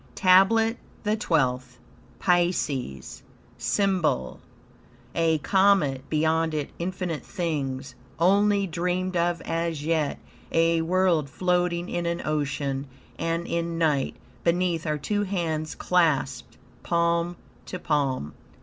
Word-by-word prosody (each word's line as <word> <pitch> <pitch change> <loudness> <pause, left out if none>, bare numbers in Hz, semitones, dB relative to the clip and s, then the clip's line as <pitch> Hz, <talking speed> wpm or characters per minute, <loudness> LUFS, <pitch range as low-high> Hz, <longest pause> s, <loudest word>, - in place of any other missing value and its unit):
TABLET 220 +5 +5 0.3
THE 210 0 +1
TWELFTH 125 - 0 0.4
Pisces 160 - 0 0.4
SYMBOL 185 - 0 0.7
A 165 -1 +2
comet, 185 -6 +2
beyond 160 +1 +1
it 150 -2 -3
infinite 175 -2 -3
things, 140 -8 -3 0.2
only 200 +3 +3
dreamed 180 +1 -2
of 170 0 +1
as 165 -2 -2
yet, 160 -3 0 0.3
a 165 0 +3
world 170 -3 +2
floating 180 +1 0
in 175 -1 -2
an 170 0 -2
ocean 140 -2 -2 0.3
and 165 +1 -1
in 170 0 -2
night, 150 -5 +1 0.3
beneath 170 -1 +1
are 150 0 0
two 205 +8 -1
hands 165 -6 -2
clasped 155 -7 0 0.2
palm 170 0 +1 0.3
to 185 - -4
palm. 140 - -1
170 Hz, 105 wpm, -26 LUFS, 150-180 Hz, 0.7 s, TABLET